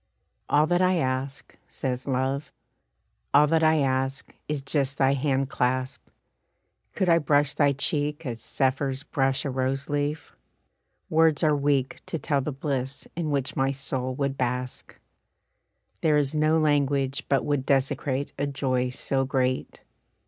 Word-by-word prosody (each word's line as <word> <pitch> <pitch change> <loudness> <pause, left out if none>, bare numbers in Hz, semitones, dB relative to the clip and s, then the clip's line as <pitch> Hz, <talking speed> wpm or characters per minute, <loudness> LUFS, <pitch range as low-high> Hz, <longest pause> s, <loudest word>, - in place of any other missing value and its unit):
"All 150 +1 +4
that 175 +2 +1
I 185 0 +3
ask," 135 -1 -3
says 130 -1 -4
Love, 135 +2 -1 0.8
"all 145 +1 +7
that 160 +2 +2
I 155 -1 +4
ask, 135 0 -1
Is 150 -1 -1
just 140 -1 0
thy 135 0 +3
hand 135 -1 0
clasp. 130 +1 -1 0.9
Could 190 - 0
I 170 -1 +5
brush 145 -1 +2
thy 145 -1 +3
cheek 150 +2 -1
As 115 -3 -5
zephyrs 135 +1 -1
brush 135 -3 0
a 140 - -1
rose 135 +2 -2
leaf, 145 +1 -2 0.8
words 160 -2 +3
are 155 -1 +4
weak 140 -2 0
To - - -3
tell 145 -2 0
the 150 - -3
bliss 135 -1 -3
in 165 -2 -2
which 140 -2 -1
my 135 0 +1
soul 130 -2 -4
would 140 0 -2
bask. 125 0 -3 1.0
There 155 -2 +3
is 145 0 +1
no 155 +1 +3
language 140 -3 +1
but 135 -2 +2
would 145 -3 0
desecrate 135 0 0
A 145 - 0
joy 130 -2 0
so 135 +1 -1
great." 130 -1 -1
140 Hz, 150 wpm, -26 LUFS, 130-150 Hz, 1.0 s, all